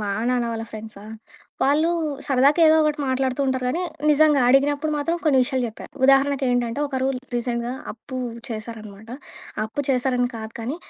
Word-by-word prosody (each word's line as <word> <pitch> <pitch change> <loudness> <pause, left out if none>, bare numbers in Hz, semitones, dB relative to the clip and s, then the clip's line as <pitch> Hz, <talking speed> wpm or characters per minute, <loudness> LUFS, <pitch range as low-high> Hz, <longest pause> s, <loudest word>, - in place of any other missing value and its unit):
మా 210 - -3 0.2
నాన్న 250 -1 +1
వాళ్ళ 225 0 -4
ఫ్రెండ్సా, 215 -2 -9 0.6
వాళ్ళు 295 +4 +3 0.4
సరదాకేదో 295 +4 +5
ఒకటి 300 0 0
మాట్లాడుతుంటారు 260 0 0
గానీ. 335 +8 -1 0.3
నిజంగా 300 -1 +4
అడిగినప్పుడు 285 +3 +3
మాత్రం 330 +4 -1
కొన్ని 285 -4 +4
విషయాలు 260 -1 -1
చెప్పా. 220 - -11 0.2
ఉదాహరణకేంటంటే, 270 -3 +2
ఒకరు 260 -1 -1 0.3
రీసెంట్‍గా 240 0 -2 0.2
అప్పు 245 +4 -10 0.3
చేశారన్నమాట. 220 -1 -8 0.5
అప్పు 220 +6 -4
చేశారని 250 -1 +1
కాదు 220 0 -7
కానీ. 255 +7 -3
260 Hz, 130 wpm, -23 LUFS, 235-285 Hz, 0.6 s, సరదాకేదో